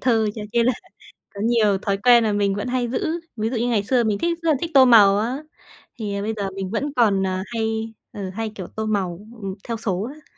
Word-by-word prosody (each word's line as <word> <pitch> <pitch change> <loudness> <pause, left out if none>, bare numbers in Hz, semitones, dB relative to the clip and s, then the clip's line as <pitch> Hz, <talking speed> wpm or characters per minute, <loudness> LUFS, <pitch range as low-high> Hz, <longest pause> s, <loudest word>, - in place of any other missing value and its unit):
thơ 225 -4 +2
cho 215 - -6
nên 235 -1 +3
là 255 - +4 0.6
có 200 - -6
nhiều 220 -4 +3
thói 195 0 -1
quen 235 +3 +5
là 220 - +1
mình 200 -1 +1
vẫn 205 +4 -3
hay 250 -1 0
giữ, 245 - -2 0.3
ví 220 -1 -1
dụ 245 - -2
như 235 +2 0
ngày 225 -4 +1
xưa 245 +3 +2
mình 215 -2 0
thích 340 +7 -1
rất 330 - 0
là - - +3
thích 335 - -3
tô 270 -2 +8
màu 205 -5 +7
á, 235 +5 -1 0.6
thì 200 -2 -3
bây 215 +2 -2
giờ 200 -2 -2
mình 195 -1 -4
vẫn 275 +7 -2
còn, 205 -5 +3
ờ, 185 0 -1
hay 225 0 -3 0.2
ừ, 195 -2 -5
hay, 220 +4 -4
kiểu, 185 -4 -6
tô 220 - -5
màu, 190 -5 -1 0.2
ừm, 195 -1 -4
theo 230 -1 -2
số 210 0 -2
á. 310 0 -21
220 Hz, 250 wpm, -22 LUFS, 200-240 Hz, 0.6 s, tô